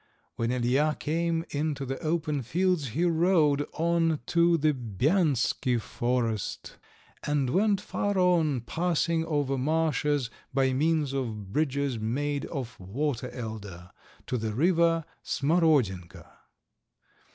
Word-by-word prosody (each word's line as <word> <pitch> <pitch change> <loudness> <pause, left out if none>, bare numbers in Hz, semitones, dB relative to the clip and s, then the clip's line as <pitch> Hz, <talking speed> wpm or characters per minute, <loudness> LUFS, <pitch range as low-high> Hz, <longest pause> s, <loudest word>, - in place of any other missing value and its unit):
When 115 0 -1
Ilija 125 +5 +1
came 165 +1 -1
into 145 -1 -2
the 135 +1 -4
open 155 -3 -1
fields 175 +3 0
he 155 +10 0
rode 160 -4 +3
on 165 -1 +1
to 170 0 +3
the 155 0 +2
Bianski 125 - +1
forest, 115 -2 -2 0.4
and 145 -4 0
went 200 +4 +2
far 205 0 -2
on, 165 -8 +3
passing 165 +3 0
over 145 -4 0
marshes, 150 -3 0 0.2
by 130 -1 +2
means 150 0 +1
of 110 -7 -4
bridges 140 -4 0
made 140 +6 -2
of 130 -6 -6
water 125 +6 -3
elder, 105 -7 -7 0.3
to 125 - -2
the 110 -1 -3
river 165 +2 +3 0.2
Smarodienka. 140 - +1
145 Hz, 115 wpm, -28 LUFS, 125-165 Hz, 0.4 s, rode